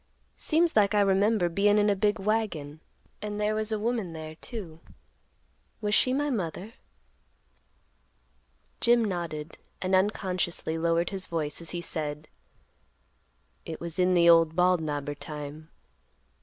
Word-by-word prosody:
"Seems 330 +1 +2
like 210 -1 +4
I 205 - +5
remember 200 0 +3
bein' 200 +4 +3
in 210 0 +3
a 205 - +3
big 205 +2 +1
wagon, 195 -8 -2 0.4
and 210 0 -4
there 210 +1 +1
was 215 0 -1
a 215 - +1
woman 220 -5 -2
there 155 -1 -7
too; 170 -3 -7 1.0
was 210 -2 -1
she 255 - +4
my 290 +2 0
mother?" 195 0 -4 2.1
Jim 235 -1 +4
nodded, 170 -5 -4 0.2
and 185 0 -2
unconsciously 185 -4 0
lowered 165 +1 +1
his 190 -2 -4
voice, 155 -2 -3
as 165 - -3
he 175 - -3
said, 150 -2 -4 1.4
"It - - -7
was 170 0 -5
in 180 0 +3
the 170 -1 +5
old 165 -1 +6
Bald 180 -1 +3
Knobber 145 -2 -3
time. 150 +1 -8
185 Hz, 140 wpm, -28 LUFS, 160-210 Hz, 2.1 s, old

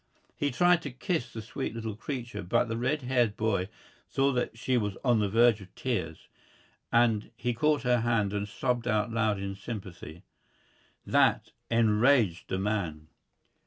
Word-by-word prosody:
He 145 - 0
tried 175 +5 +3
to 145 - -5
kiss 130 -1 -3
the 110 -1 -7
sweet 115 +1 -5
little 110 -2 -4
creature, 120 -3 -5
but 90 +6 +1
the 115 - -3
red 130 +5 -1
haired 120 -4 +1
boy 100 -4 0 0.4
saw 135 0 +2
that 125 -2 -2
she 125 +2 0
was 105 -5 -1
on 120 -3 +4
the 105 -1 +1
verge 115 0 +4
of 95 -1 -14
tears, 90 -11 -3 0.6
and 115 -3 +3
he 120 +1 -2
caught 150 +5 +1
her 125 -1 +3
hand 115 -4 +1
and 105 0 -2
sobbed 120 +3 -1
out 110 0 +1
loud 110 -2 +1
in 100 0 -4
sympathy. 95 -5 -8 0.8
That - - +2 0.2
enraged 115 -3 +3
the 95 - -1
man. 90 -7 -2
115 Hz, 165 wpm, -29 LUFS, 105-125 Hz, 0.8 s, on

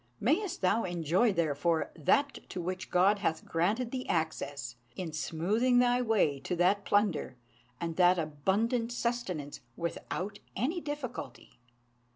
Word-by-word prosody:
Mayest 330 - +1
thou 200 +5 +3
enjoy, 175 +5 +2
therefore, 165 -1 0
that 275 - +2
to - - -5
which 185 +2 -4
God 195 +3 +4
hath 160 -5 -1
granted 210 +9 0
thee 255 -1 -4
access, 140 -6 -2 0.2
in 170 -4 -5
smoothing 205 +11 +1
thy 245 0 +4
way 210 - +2
to 180 - -3
that 190 +4 +2
plunder 205 -11 +1 0.4
and 165 -1 -3
that 180 0 +5
abundant 195 - 0
sustenance 235 - -2 0.2
without 185 +4 -4 0.2
any 305 - -1
difficulty!" 290 - -6
185 Hz, 130 wpm, -31 LUFS, 165-235 Hz, 0.4 s, that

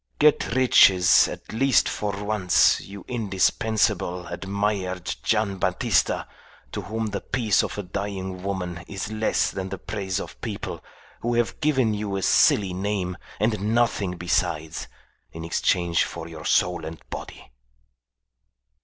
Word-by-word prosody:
"Get 150 -5 +3
riches 95 -8 +6
at - - -8
least 130 -2 +3
for 100 -1 -3
once, 105 -4 +3
you 100 0 -10
indispensable, 105 -4 0
admired 95 0 -2
Gian' 105 -3 0
Battista, - - +1 0.4
to - - -4
whom 110 +2 -3
the 100 - -3
peace 110 -7 +1
of - - -4
a 105 - -3
dying 95 -1 -4
woman 90 -3 -4
is 100 +1 -5
less 110 0 +1
than 95 -1 -5
the - - -5
praise 100 -3 -3
of - - -9
people - - -5 0.4
who 120 +1 -1
have 120 -1 0
given 130 -7 +2
you 105 -1 -3
a 95 - -2
silly 95 +1 +4
name 95 -1 -2 0.2
and 105 0 +1
nothing 105 -6 +1
besides 85 -2 -1 0.5
in 80 0 -7
exchange 85 0 +1
for 85 -1 -6
your 80 -2 -9
soul 90 -2 +2
and 80 +1 -7
body." - - -8
100 Hz, 135 wpm, -24 LUFS, 90-110 Hz, 0.5 s, riches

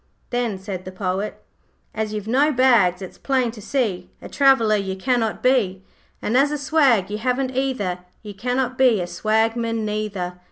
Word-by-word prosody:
Then 240 -5 -1
said 190 -1 -6
the 185 - -8
Poet 190 +2 -3 0.5
'As 215 -1 -3
you've 210 -1 -5
no 275 +6 +3
bags 230 -9 +3
it's 185 - -10
plain 260 -4 0
to 225 -2 -11
see 200 -7 -2
A - - -9
traveller 265 -6 +4
you 195 -2 -2
cannot 230 +1 -1
be; 210 -8 +2 0.4
And 220 - -1
as 275 +3 +4
a 300 - -2
swag 265 - +2
you 210 - -3
haven't 255 +2 -1
either 250 -9 -1 0.2
You 210 -1 -8
cannot 250 +4 -2
be 250 -5 +5
a 175 - -2
swagman 225 +3 0
neither. 205 -4 -3
220 Hz, 170 wpm, -22 LUFS, 195-255 Hz, 0.5 s, be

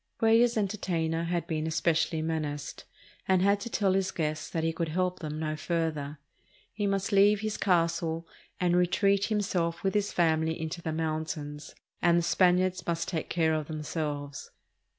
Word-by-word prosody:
Cuellar's 230 +1 +4
entertainer 170 -5 -1
had 175 0 -1
been 155 -1 -2
espe 160 +1 +2
cially 160 0 0
menaced, 155 -3 -3 0.4
and 185 -1 +3
had 200 +1 +3
to 235 - -6
tell 200 -4 +1
his 190 -1 +1
guests 155 -4 -3
that 165 - -2
he 165 0 0
could 165 -1 -2
help 180 +2 -1
them 155 -2 -5
no 155 -1 -2
further. 155 -2 -2 0.6
He 205 -2 -1
must 195 +1 -1
leave 200 +1 +5
his 215 -1 -2
castle 165 -2 0 0.3
and 175 -1 +2
re 180 0 +4
treat 200 +2 +2
himself 185 -6 -1
with 195 - +1
his 205 -1 0
family 160 -1 +1
into 160 +2 -4
the 160 - -3
mountains, 155 -2 -4 0.3
and 170 -1 +4
the 170 - +2
Spaniards 185 +1 +2
must 170 -1 -1
take 165 -4 -3
care 160 -2 +2
of 155 -2 -2
themselves. 150 -2 -4
170 Hz, 170 wpm, -29 LUFS, 160-190 Hz, 0.6 s, leave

